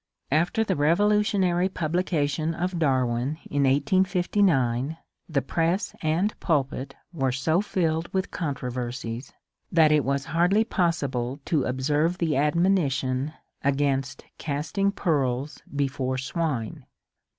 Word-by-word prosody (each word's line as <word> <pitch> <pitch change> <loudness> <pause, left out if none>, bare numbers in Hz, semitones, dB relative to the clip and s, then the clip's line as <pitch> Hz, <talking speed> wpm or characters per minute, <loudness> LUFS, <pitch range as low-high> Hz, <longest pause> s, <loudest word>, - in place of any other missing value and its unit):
After 170 +9 +2
the 195 -4 0
revolutionary 190 +2 +2
publication 160 -2 -1
of 180 +1 -2
Darwin 130 -1 +1
in 145 -1 +2
1859, 160 - +2 0.3
the 140 -5 0
press 170 +7 0
and 170 +7 +1
pulpit 135 -3 -1 0.2
were 135 -5 0
so 155 +7 +1
filled 165 -5 -1
with 190 0 -1
controversies 125 -4 -4 0.4
that 160 -3 +5
it 150 -2 +4
was 140 +1 -1
hardly 180 +6 +4
possible 140 - -1
to 150 -6 +1
observe 150 +7 +1
the 165 -5 0
admonition 145 -3 +1 0.3
against 135 -2 0
casting 160 +7 -1
pearls 140 -6 -1
before 130 -2 -1
swine. 130 -3 -3
150 Hz, 105 wpm, -26 LUFS, 135-175 Hz, 0.4 s, that